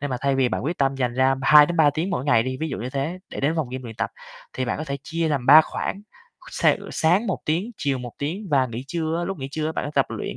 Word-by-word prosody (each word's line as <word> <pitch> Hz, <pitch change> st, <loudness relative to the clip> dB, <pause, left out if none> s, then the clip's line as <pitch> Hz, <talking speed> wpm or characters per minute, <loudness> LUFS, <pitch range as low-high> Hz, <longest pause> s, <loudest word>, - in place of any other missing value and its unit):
Nhưng 145 Hz, -1 st, -3 dB
mà 125 Hz, -, -1 dB
thay 140 Hz, 0 st, +1 dB
vì 135 Hz, -2 st, +2 dB
bạn 120 Hz, -, -3 dB
quyết 170 Hz, +4 st, -2 dB
tâm 135 Hz, -1 st, +1 dB
dành 125 Hz, -3 st, -1 dB
ra 130 Hz, +1 st, +3 dB
2 150 Hz, +2 st, +8 dB
đến 175 Hz, -, -3 dB
3 155 Hz, -3 st, +5 dB
tiếng 165 Hz, +6 st, -3 dB
mỗi 135 Hz, -8 st, -2 dB
ngày 140 Hz, -6 st, +4 dB
đi, 130 Hz, +2 st, -3 dB
ví 160 Hz, -, -1 dB
dụ 135 Hz, -, -4 dB
như 125 Hz, +3 st, -5 dB
thế, 140 Hz, +6 st, -3 dB
để -, -, -6 dB
đến 145 Hz, +3 st, +1 dB
phòng 155 Hz, -6 st, -1 dB
gym 130 Hz, +1 st, -5 dB
luyện 115 Hz, -3 st, -9 dB
tập, -, -, -2 dB, 0.4 s
thì 130 Hz, -, -2 dB
bạn 125 Hz, -, -2 dB
có 155 Hz, -, -4 dB
thể 140 Hz, -2 st, -4 dB
chia 165 Hz, +2 st, -2 dB
làm 140 Hz, -5 st, -1 dB
3 150 Hz, +3 st, +10 dB
khoảng, 195 Hz, +5 st, -4 dB, 0.5 s
s -, -, -1 dB, 0.2 s
sáng 180 Hz, +8 st, +2 dB
1 -, -, -1 dB
tiếng, 175 Hz, +9 st, -1 dB
chiều 140 Hz, -2 st, -1 dB
1 120 Hz, -2 st, -7 dB
tiếng 175 Hz, +9 st, -4 dB
và 135 Hz, -3 st, +3 dB
nghỉ 120 Hz, +1 st, -6 dB
trưa 160 Hz, +1 st, -2 dB
á, 175 Hz, -, -2 dB
lúc 190 Hz, 0 st, -4 dB
nghỉ 135 Hz, -1 st, -5 dB
trưa 155 Hz, +2 st, -2 dB
á 160 Hz, -, -2 dB
bạn -, -, -3 dB
á 145 Hz, -, -4 dB
tập -, -, +3 dB
luyện, -, -, -5 dB
145 Hz, 305 wpm, -23 LUFS, 130-160 Hz, 0.5 s, 3